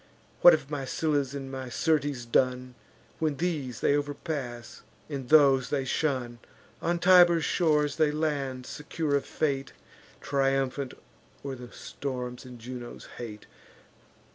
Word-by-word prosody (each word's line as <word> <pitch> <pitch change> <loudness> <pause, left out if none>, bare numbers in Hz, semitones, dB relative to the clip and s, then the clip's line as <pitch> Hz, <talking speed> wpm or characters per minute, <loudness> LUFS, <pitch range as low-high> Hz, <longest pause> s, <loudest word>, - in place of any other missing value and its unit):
What 175 - +10
have 150 -2 -1
my 145 -2 -2
Scyllas 140 0 -1
and 135 -1 -6
my 130 -1 -5
Syrtes 145 -4 0
done, 125 +1 +1 0.5
When 155 -3 0
these 145 -9 -2
they 145 - +3
overpass, 145 -5 -4 0.3
and 135 -4 -6
those 140 -4 +6
they 140 -2 -1
shun? 130 -5 -1 0.4
On 170 +1 0
Tiber's 175 -2 +6
shores 150 -3 +2
they 155 -2 +4
land, 145 -4 -2
secure 150 +1 -2
of 140 - -1
fate, 140 -3 -1 0.5
Triumphant 135 -1 0 0.5
o'er 135 - -3
the 125 -2 -9
storms 125 -2 -6
and 125 -1 -10
Juno's 120 +1 -8
hate. 110 -3 -7
140 Hz, 130 wpm, -28 LUFS, 125-150 Hz, 0.5 s, What